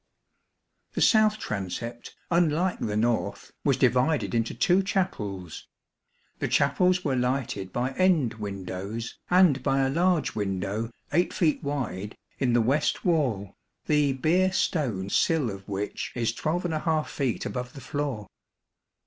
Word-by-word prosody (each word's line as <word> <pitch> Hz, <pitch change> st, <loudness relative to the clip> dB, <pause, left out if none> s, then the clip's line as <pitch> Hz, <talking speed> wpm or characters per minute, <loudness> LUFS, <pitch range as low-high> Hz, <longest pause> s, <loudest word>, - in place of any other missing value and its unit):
The -, -, -2 dB
south 215 Hz, -1 st, +5 dB
transept, 115 Hz, -, -5 dB, 0.2 s
unlike 170 Hz, +1 st, +2 dB
the 105 Hz, -1 st, -2 dB
north, 115 Hz, +1 st, -1 dB
was -, -, +2 dB
divided 130 Hz, +5 st, +2 dB
into 115 Hz, -1 st, 0 dB
two 185 Hz, +2 st, +3 dB
chapels. 105 Hz, -, -3 dB, 0.7 s
The -, -, 0 dB
chapels 180 Hz, 0 st, +2 dB
were 135 Hz, -3 st, +1 dB
lighted 125 Hz, -6 st, -1 dB
by 125 Hz, +2 st, -1 dB
end 165 Hz, -6 st, +2 dB
windows, 100 Hz, +2 st, -5 dB
and 180 Hz, -7 st, +5 dB
by 135 Hz, 0 st, +1 dB
a 135 Hz, 0 st, +1 dB
large 170 Hz, -1 st, +2 dB
window, 100 Hz, +2 st, -2 dB, 0.2 s
8 175 Hz, +4 st, +2 dB
feet 165 Hz, -6 st, +2 dB
wide, 125 Hz, -9 st, -3 dB, 0.2 s
in 125 Hz, -3 st, +2 dB
the 120 Hz, -, +4 dB
west 140 Hz, +6 st, +1 dB
wall, 130 Hz, -, +1 dB, 0.3 s
the 150 Hz, -2 st, +3 dB
Beer 175 Hz, +8 st, +2 dB
stone 120 Hz, -, -1 dB
sill 155 Hz, -9 st, +2 dB
of 95 Hz, +1 st, -10 dB
which 100 Hz, +1 st, -3 dB
is 115 Hz, -2 st, 0 dB
12| 160 Hz, 0 st, -1 dB
feet 135 Hz, -5 st, -2 dB
above 125 Hz, -1 st, -4 dB
the 140 Hz, -, -9 dB
floor. 140 Hz, -8 st, -3 dB
130 Hz, 130 wpm, -27 LUFS, 110-160 Hz, 0.7 s, south